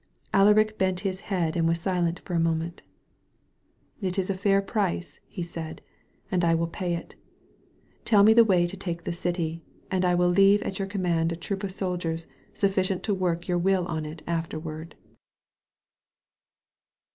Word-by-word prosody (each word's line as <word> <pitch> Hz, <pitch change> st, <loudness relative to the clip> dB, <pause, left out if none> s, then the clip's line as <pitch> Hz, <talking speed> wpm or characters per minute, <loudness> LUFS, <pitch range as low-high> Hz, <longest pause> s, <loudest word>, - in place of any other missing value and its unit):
Alaric 215 Hz, +2 st, +4 dB
bent 185 Hz, -1 st, +1 dB
his 190 Hz, -2 st, -2 dB
head 175 Hz, -5 st, 0 dB
and 165 Hz, -1 st, +2 dB
was 165 Hz, 0 st, +1 dB
silent 175 Hz, -1 st, 0 dB
for 180 Hz, -, -7 dB
a 170 Hz, -, +2 dB
moment. 165 Hz, +1 st, -1 dB, 1.2 s
"It 185 Hz, -1 st, -2 dB
is 190 Hz, 0 st, 0 dB
a -, -, +1 dB
fair 195 Hz, +1 st, +2 dB
price," 195 Hz, -3 st, -2 dB
he 180 Hz, -, -5 dB
said, 165 Hz, -1 st, -7 dB, 0.5 s
"and 180 Hz, -2 st, +1 dB
I 165 Hz, -1 st, +4 dB
will 165 Hz, +1 st, +1 dB
pay 175 Hz, +1 st, -2 dB
it. 170 Hz, -, -8 dB, 0.9 s
Tell 205 Hz, -3 st, +5 dB
me 220 Hz, +2 st, +7 dB
the 230 Hz, +1 st, +8 dB
way 185 Hz, -5 st, +3 dB
to 175 Hz, +3 st, -5 dB
take 175 Hz, -3 st, -5 dB
the -, -, -3 dB
city, 170 Hz, -1 st, -2 dB, 0.3 s
and 185 Hz, -1 st, +1 dB
I 180 Hz, -1 st, +3 dB
will 175 Hz, 0 st, +3 dB
leave 195 Hz, +3 st, +5 dB
at 190 Hz, -, -4 dB
your 195 Hz, -, -1 dB
command 175 Hz, -4 st, 0 dB
a -, -, -2 dB
troop 195 Hz, +4 st, -4 dB
of 195 Hz, -, -2 dB
soldiers 175 Hz, -4 st, -3 dB, 0.3 s
sufficient 190 Hz, -2 st, 0 dB
to 210 Hz, -, 0 dB
work 175 Hz, -3 st, -1 dB
your 175 Hz, -1 st, +1 dB
will 190 Hz, 0 st, +2 dB
on 160 Hz, -3 st, -3 dB
it 155 Hz, +1 st, -9 dB
afterward." 160 Hz, -1 st, -4 dB
180 Hz, 170 wpm, -26 LUFS, 165-195 Hz, 1.2 s, the